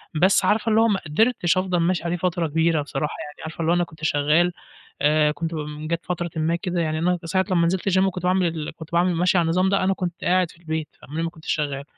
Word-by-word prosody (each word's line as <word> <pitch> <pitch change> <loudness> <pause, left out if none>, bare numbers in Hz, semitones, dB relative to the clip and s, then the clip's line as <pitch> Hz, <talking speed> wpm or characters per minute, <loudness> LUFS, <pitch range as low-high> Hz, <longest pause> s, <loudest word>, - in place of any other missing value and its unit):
بس 185 +5 +4
عارفة 215 +1 +2
اللي 220 +1 +4
هو 230 - +4
ما 200 -3 +1
قدرتش 180 +2 +2
أفضل 185 -1 0
ماشي 170 0 +1
عليه 170 +1 -1
فترة 175 -1 -1
كبيرة 160 0 +1
بصراحة، 145 +1 -3
يعني 150 0 -11
عارفة 160 +1 -8
اللي 165 +1 +1
هو - - +4
أنا 175 - +2
كنت 160 -2 -11
شغال، 155 +4 +2 0.5
آآ، 150 0 +3
كنت 165 +2 -4
ب 150 0 -5
جات 170 +1 -2
فترة 175 -1 -3
ما 160 +2 +1
كده 175 0 -2
يعني 155 -1 -1
أنا 180 +2 +1
ساعة 185 +3 +1
لمّا 170 -2 +3
نزلت 190 +2 0
الgym 190 - +2
وكنت 185 -2 -2
باعمل 185 0 +2
ال 160 -2 -4
كنت 160 -1 -11
باعمل 175 +1 +2
ماشي 180 +2 +2
على 170 - +3
النظام 185 +3 +2
ده، 195 -1 +1
أنا 195 +1 +2
كنت 180 -2 -5
قاعد 180 -1 +2
في - - -20
البيت 160 -2 -4 0.2
قبليها 160 +4 -4
ما 165 - -1
كنتش 160 -1 -6
شغال، 145 -2 -2
170 Hz, 250 wpm, -23 LUFS, 155-180 Hz, 0.5 s, بس